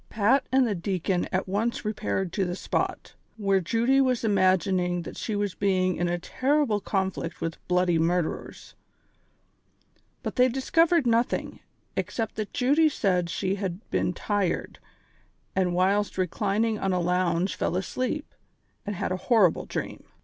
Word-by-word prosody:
Pat 235 +6 +2
and 260 0 +4
the 220 - 0
deacon 180 0 -1
at 185 +1 -1
once 215 +5 -1
repaired 200 -4 -2
to 200 - +1
the 175 -1 -2
spot, - - -3 0.2
where 195 -2 +2
Judy 235 +9 +2
was 255 -3 +1
imagining 185 -3 +2
that - - -8
she 215 - -3
was 205 -2 -1
Ijeing 185 -1 +1
in 175 - 0
a 175 0 0
terrible 260 - +1
con 190 -1 -1
flict 170 -2 -6
with 165 0 -4
bloody 180 -2 +2
murderers; 170 0 -2 1.5
but - - -4
tliey 250 0 +5
discovered 330 +5 +3
notliing, 235 0 0 0.4
except 225 -2 -2
that 215 -2 -3
Jud^ 285 +4 +3
said 180 -8 0
she 185 +2 -1
had 190 +2 -4
been - - +1
tired, 200 0 -2 0.8
and 180 -2 +1
whilst 195 +3 +1
re 185 - +2
clining 210 +4 -1
on 190 -1 +1
a 180 - +1
lounge 180 0 +1
fell 175 - -1
asleep, 255 +10 -3 0.5
and 205 - -2
had 185 - -2
a 185 - 0
horrible 210 -9 +4
dream. - - -5
195 Hz, 155 wpm, -26 LUFS, 180-230 Hz, 1.5 s, tliey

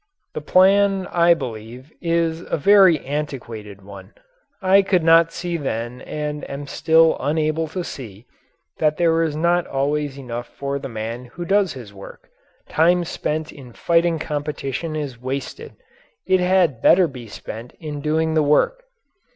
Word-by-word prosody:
The - - -4
plan, 195 +3 +4
I 170 0 +4
believe, 125 0 -8
is 165 -1 0
a - - -1
very 190 -1 +5
antiquated 120 -9 -6
one. 100 0 -12 0.4
I 195 0 +5
could 190 -3 +1
not 165 0 +5
see 170 0 -3
then 125 -4 -4
and 150 -1 -5
am 140 +1 -6
still 160 +3 +3
unable 155 +2 0
to 180 +3 -4
see 115 - -9 0.5
that 155 -1 +1
there 165 -1 +2
is 160 -3 -1
not 170 +2 +1
always 140 +1 -1
enough 120 -3 -6
for 140 0 -4
the 135 - -7
man 115 +2 -5
who 170 +8 -8
does 195 0 +2
his 120 -6 -10
work; 100 0 -13 0.4
time 175 +3 +3
spent 155 -2 -3
in 130 -5 -13
fighting 170 +2 +1
competition 150 0 -4
is 140 -6 -5
wasted; 140 - -5 0.5
it 185 - +3
had 180 -9 +2
better 180 -1 +5
be 125 -5 -10
spent 115 +3 -9
in 150 -2 -6
doing 160 +2 0
the 155 - +3
work. 485 - +2
150 Hz, 150 wpm, -21 LUFS, 130-170 Hz, 0.5 s, very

